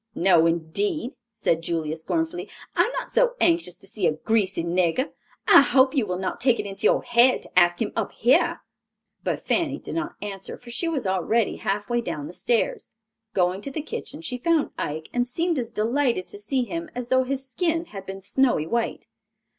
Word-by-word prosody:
"No, 170 -2 +5
indeed," 235 - -1 0.2
said 190 -7 0
Julia, 160 -2 -2
scornfully, 325 - -2 0.3
"I - - +4
am 465 - -3
not - - -4
so - - +3
anxious 335 - +2
to - - -15
see 195 -2 -1
a - - +2
greasy 195 0 0
nigger. 175 - +1 0.4
I - - +9
hope 265 0 +4
you 260 -8 +1
will 180 -1 -2
not 190 +5 -3
take 245 -2 +3
it - - -2
into 195 +2 -4
your - - +2
head 240 +2 +4
to - - +2
ask 175 0 +3
him 225 - -1
up 225 -3 -1
here." 265 +9 +3 0.6
But - - -2
Fanny - - +1
did - - -8
not 335 +1 -3
answer, 195 -2 -6
for 240 -1 -12
she 290 +8 -2
was 305 -8 -1
already 190 +4 +1
half 205 +1 -2
way 240 0 0
down 150 -10 -4
the 170 - -8
stairs. 235 +4 0 0.5
Going 180 +1 +1
to 275 - -4
the 275 - -4
kitchen 300 0 -6
she 250 -6 -3
found 330 +2 +1
Ike 155 +2 -4
and 245 0 +1
seemed 330 +4 0
as 235 -1 -4
delighted 235 -2 +1
to 205 - -6
see 255 +5 0
him 335 +5 -5
as 245 -1 -4
though 260 0 +4
his 270 +1 -3
skin 330 +4 -1
had 195 - -9
been 195 0 -7
snowy 220 - +2
white. 235 +7 -2
235 Hz, 200 wpm, -25 LUFS, 190-275 Hz, 0.6 s, I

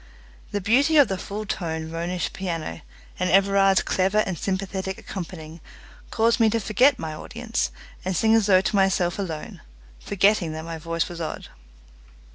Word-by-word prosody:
The 205 - -2
beauty 275 - +3
of 285 - +6
the 190 - -1
full 210 +3 -5
toned 160 -4 -4
Ronisch 175 +2 -3
piano, 165 -4 -4 0.4
and 180 0 +1
Everard's 195 0 +4
clever 190 +2 +1
and 185 - -3
sympathetic 190 +1 -3
accompanying, 165 -4 -8 0.5
caused 230 +1 +2
me 225 -1 +5
to 230 +1 0
forget 250 +6 +3
my 160 -6 -5
audience, 230 +8 -3 0.3
and 185 0 -2
sing 220 +6 +3
as 225 -2 +4
though 185 -2 +6
to 210 +2 -1
myself 190 -2 +2
alone, 165 -6 -5 0.4
forgetting 200 -4 +2
that 160 +1 -6
my 165 -1 -6
voice 165 +1 -2
was 170 -1 -7
odd. 160 - -5
190 Hz, 160 wpm, -24 LUFS, 170-210 Hz, 0.5 s, of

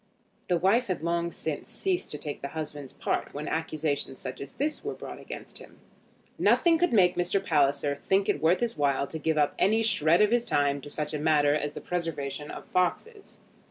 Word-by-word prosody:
The 175 - +2
wife 200 +8 +3
had 185 -4 -2
long 170 0 0
since 155 -2 -5
ceased 375 -2 -2
to 150 - -5
take 145 -1 -6
the 140 - -3
husband's 145 -3 -5
part - - -2
when 150 +1 -4
accusations 155 -4 -2
such 130 0 -7
as 140 - -8
this 300 +2 -2
were - - -3
brought - - -8
against - - -9
him. - - -15 0.6
Nothing 335 -2 +4
could 355 - +2
make 185 -6 +4
Mr. 175 +2 +1
Palliser 140 -2 +2
think 195 +1 +3
it 145 - 0
worth 165 +6 +3
his 235 -1 0
while 140 -1 +1
to 160 +3 -7
give 160 0 0
up 145 -1 +3
any 220 +4 +3
shred 170 -5 +3
of 210 - +3
his 240 0 +3
time 145 -8 +1
to 145 - -9
such 150 +1 -3
a 150 - -2
matter 145 -1 +3
as 150 -1 -1
the - - -7
preservation 150 -5 -3
of - - -8
foxes. 400 - -2
160 Hz, 205 wpm, -28 LUFS, 145-190 Hz, 0.6 s, Nothing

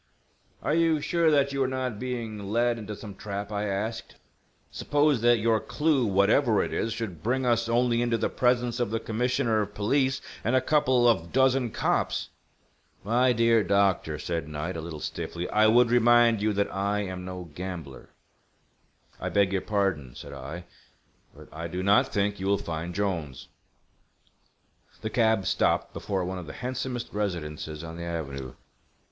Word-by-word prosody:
"Are - - +1
you 165 -1 +3
sure 170 +2 +2
that 140 -2 +2
you 140 - -1
are 130 - +2
not 130 -4 -3
being 120 -4 -4
led 120 +2 +1
into 105 -1 -6
some 100 0 -9
trap?" 100 +1 -6
I 105 0 -2
asked. 105 +3 -3 0.6
"Suppose 145 -4 +1
that 120 0 +5
your 110 0 +2
clue, 150 -4 +1
whatever 105 +4 +3
it - - -4
is, 115 - -1
should 110 -8 -5
bring 130 +5 0
us 115 -1 +1
only 120 0 +2
into 120 -1 +1
the - - 0
presence 125 -1 +1
of 120 - 0
the 115 +1 -1
Commissioner 115 -1 0
of 105 0 -5
Police 130 +5 +1 0.2
and 120 +4 +1
a - - +6
couple 130 -3 +3
of 90 -8 +2
dozen 130 -1 +3
cops!" - - -1 0.7
"My 120 +5 +3
dear 115 -1 +3
doctor," 95 -5 +1
said 80 -1 -3
Knight, 75 +4 -4
a 80 - -4
little 80 -1 -7
stiffly. 85 +1 -4
"I 110 0 +4
would 120 +2 +5
remind 120 -2 +5
you 110 +1 +2
that 100 0 -1
I 100 +1 0
am 95 -2 -5
no 90 -3 -7
gambler." 85 -6 -7 1.1
"I - - -3
beg 100 -1 +2
your 95 - +1
pardon," 95 - -1
said - - -9
I. 85 +4 -7 0.7
"But - - -13
I 85 +2 -5
do 90 +2 -4
not 100 +1 +4
think 100 0 -1
you 95 - -3
will 100 0 +3
find 85 0 -5
Jolnes." 85 -10 -3 1.5
The 110 - -3
cab 110 -4 +2
stopped - - +1
before 95 -3 -2
one 95 +1 -4
of 85 - -9
the - - -7
handsomest 125 -1 -4
residences 80 -6 -4
on 80 0 -7
the 85 - -6
avenue. 70 -6 -5
105 Hz, 170 wpm, -27 LUFS, 90-120 Hz, 1.5 s, a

